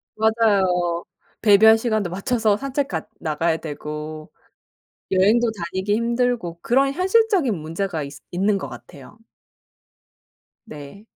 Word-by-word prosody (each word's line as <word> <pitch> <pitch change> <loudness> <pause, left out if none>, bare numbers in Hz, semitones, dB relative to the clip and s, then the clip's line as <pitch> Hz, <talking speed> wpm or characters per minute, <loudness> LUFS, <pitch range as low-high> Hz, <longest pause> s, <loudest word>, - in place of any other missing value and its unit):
맞아요. 195 -6 +1 0.4
배변 220 +1 +6
시간도 215 -5 -1
맞춰서 215 +3 0
산책 275 +2 -2
갔 210 - -5
나가야 160 +1 0
되고 155 0 -7 0.8
여행도 220 +5 +3
다니기 190 +1 -2
힘들고 235 -7 -1
그런 275 +3 +2
현실적인 375 - +2
문제가 165 +1 -4
있 140 0 -8 0.2
있는 195 +3 +1
것 - - -6
같아요. 145 - -13 1.5
네. 150 +6 -11
200 Hz, 240 characters per minute, -22 LUFS, 170-235 Hz, 1.5 s, 배변